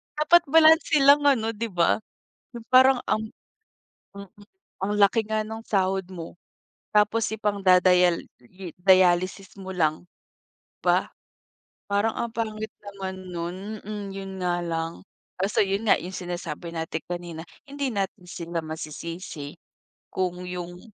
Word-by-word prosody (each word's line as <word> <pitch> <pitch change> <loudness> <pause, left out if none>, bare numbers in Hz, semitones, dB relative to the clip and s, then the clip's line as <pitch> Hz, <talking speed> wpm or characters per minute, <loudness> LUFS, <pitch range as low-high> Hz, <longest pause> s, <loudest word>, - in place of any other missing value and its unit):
Dapat 335 +3 +5
balanse 315 -1 +5
lang 285 +1 +6
ano, 230 -6 +3
di 230 +1 -4
ba? 175 -4 +2 0.6
Yung 235 -1 -9
parang 260 0 +6
ang 215 - +1 0.9
mm 200 -2 -9 0.5
ang 205 +2 -1
laki 205 +3 +4
nga 215 0 0
nung 220 +1 -7
sahod 195 -3 0
mo, 170 -3 -8 0.6
tapos 210 +2 +3
ipangda-dial 185 -4 +3 0.2
i-dialysis 185 +3 +1
mo 190 -1 -8
lang, 155 -3 0
di 175 - -34 0.6
ba? - - +1 0.7
Parang 205 +2 +1
ang 235 - -1
pangit 220 -1 -3 0.2
naman 195 -2 -6 0.2
nun 170 +1 -4 0.2
hmm 205 -1 -6
yun 195 -1 -6
nga 175 0 0
lang, 165 -1 -3 0.4
kaso 200 +2 +2
yun 200 +3 -2
nga, - - +7
yung 180 - -6
sinasabi 175 -2 -6
natin 160 0 -3
kanina, 175 -2 -6 0.2
hindi 280 -4 -4
natin 190 -2 -3
sila 170 -1 -4
masisisi. 160 0 -7 0.5
Kung 180 -1 -2
yung, 175 0 -6
190 Hz, 130 wpm, -25 LUFS, 175-215 Hz, 0.9 s, nga